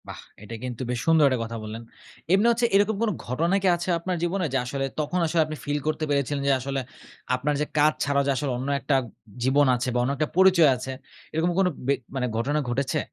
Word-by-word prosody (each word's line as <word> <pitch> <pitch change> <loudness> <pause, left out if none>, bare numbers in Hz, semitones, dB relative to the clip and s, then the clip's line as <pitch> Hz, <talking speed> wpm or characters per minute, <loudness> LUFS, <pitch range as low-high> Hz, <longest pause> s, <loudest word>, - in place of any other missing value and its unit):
বাহ! - - -8 0.2
এটা 115 +2 -7
কিন্তু 125 -2 -5
বেশ 125 -1 -1
সুন্দর 160 -3 +5
একটা 130 -2 0
কথা 115 0 -5
বললেন। 110 +2 -6 0.5
এমনি 200 +4 +4
হচ্ছে 235 +1 +1
এরকম 205 +2 +3
কোনো 225 -3 +1
ঘটনা 165 +10 0
কি 190 - +1
আছে 175 +2 -5
আপনার 180 +2 -2
জীবনে? 180 +1 0
যে - - +3
আসলে, 135 +2 -2
তখন 155 +4 -1
আসলে, 165 0 +2
আপনি 155 0 -6
ফিল 145 +1 -1
করতে 155 0 -1
পেরেছিলেন 140 0 0
যে, - - +4
আসলে 135 +1 -3 0.6
আপনার 140 +4 -1
যে - - +1
কাজ 150 +1 +5
ছাড়াও 140 -1 +1
যে - - +3
আসলে, 140 0 -2
অন্য 130 +3 -4
একটা 135 +1 0 0.5
জীবন 140 +3 +4
আছে 120 +1 -3
বা - - 0
অন্য 130 - 0
একটা 155 - 0
পরিচয় 185 -5 +6
আছে, 130 +1 -6 0.4
এরকম 165 +3 +1
কোনো 190 -1 +3 0.2
বে 140 - +4 0.2
মানে 130 -1 0
কোনো 110 - -6
ঘটনা 140 +6 0
ঘটেছে? 140 +5 0
145 Hz, 225 wpm, -25 LUFS, 130-170 Hz, 0.6 s, পরিচয়